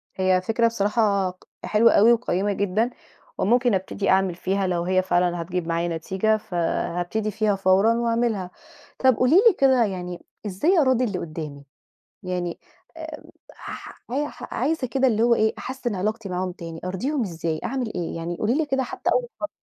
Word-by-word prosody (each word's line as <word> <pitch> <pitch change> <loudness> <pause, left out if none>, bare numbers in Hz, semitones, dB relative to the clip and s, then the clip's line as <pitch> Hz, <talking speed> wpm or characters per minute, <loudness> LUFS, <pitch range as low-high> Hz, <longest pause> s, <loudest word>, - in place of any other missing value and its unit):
هي 185 -1 +2
فكرة 230 +4 +2
الصراحة 205 -3 +1
ق 185 - -14 0.2
حلوة 225 +2 +4
أوي 225 +4 +6
وقيّمة 205 -4 0
جدًا 205 +4 0 0.5
وممكن 240 +2 +2
أبتدي 190 +1 -1
أعمل 190 -2 +3
فيها 190 +1 -1
لو 175 -1 0
هي 185 +1 +2
فعلًا 175 -2 +1
هتجيب 175 0 -3
معايا 170 +1 0
نتيجة، 195 +6 0
فهابتدي 175 +3 -2
فيها 210 -1 +1
فورًا 195 +4 +4
وأعملها. 230 -5 0 0.5
طَب 260 -2 +4
قولي 255 +8 +3
لي 440 +2 +7
كده 260 -4 +4
يعني 180 -3 -5 0.2
إزاي 255 - +1
أراضي 260 -2 +3
اللي 200 -7 -1
قُدّامي؟ 155 -3 -7 0.6
يعني 180 -2 -3 0.4
آآ - - -8 0.3
ح - - -10
أيح 290 +2 -4
عايزة 280 +1 0
كده 265 +2 +1
اللي 220 -1 +1
هو 235 0 +5
إيه، 220 0 +2
أحسِّن 250 -4 -4
علاقتي 215 +3 -2
معاهم 180 0 -2
تاني، 165 -2 -8
أرضيهم 245 +10 -1
إزاي، 165 -4 -3
أعمل 250 -4 -2
إيه؟ 170 -1 -3
يعني 170 +1 -4
قولي 225 +4 0
لي 315 0 +1
كده 270 -1 0
حتّى - - -2
أول - - 0
خط 310 - -2
200 Hz, 170 wpm, -24 LUFS, 180-235 Hz, 0.6 s, لي